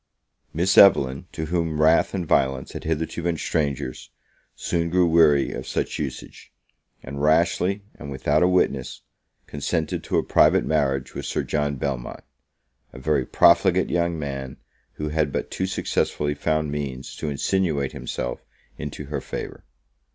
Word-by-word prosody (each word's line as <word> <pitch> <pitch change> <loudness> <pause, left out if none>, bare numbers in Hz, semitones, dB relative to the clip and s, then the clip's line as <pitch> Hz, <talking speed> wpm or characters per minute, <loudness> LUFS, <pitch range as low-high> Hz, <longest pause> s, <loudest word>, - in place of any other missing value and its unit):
Miss 90 +4 +3
Evelyn, 70 -6 +5
to 80 - -4
whom 80 -2 -1
wrath 80 +5 +4
and 90 -3 -2
violence 65 -3 +1
had - - -8
hitherto 80 +1 -2
been 85 -1 -1
strangers, 70 -5 -2 0.5
soon 85 -1 -1
grew 90 +1 +3
weary 80 -4 +4
of - - -6
such - - -2
usage; - - -7 0.5
and 70 +2 -6
rashly, 85 +6 +2
and 70 - -10
without 70 +3 +1
a 90 - +5
witness, 90 0 0 0.4
consented 80 +2 -2
to - - 0
a - - +2
private - - +4
marriage 70 -4 0
with - - -5
Sir - - -1
John 75 -1 -1
Belmont, 65 -2 -4 0.7
a - - -12
very 70 0 0
profligate 95 +2 +4
young 85 -1 0
man, 70 -3 -5 0.4
who 75 0 -4
had 75 -1 0
but - - -3
too 95 - -2
successfully 75 -5 -1
found 75 +1 -1
means 70 -3 -5
to 75 - -3
insinuate 75 -1 0
himself 60 - -5 0.4
into 75 0 -6
her 75 +1 -4
favour. - - -7
75 Hz, 150 wpm, -24 LUFS, 70-85 Hz, 0.7 s, Evelyn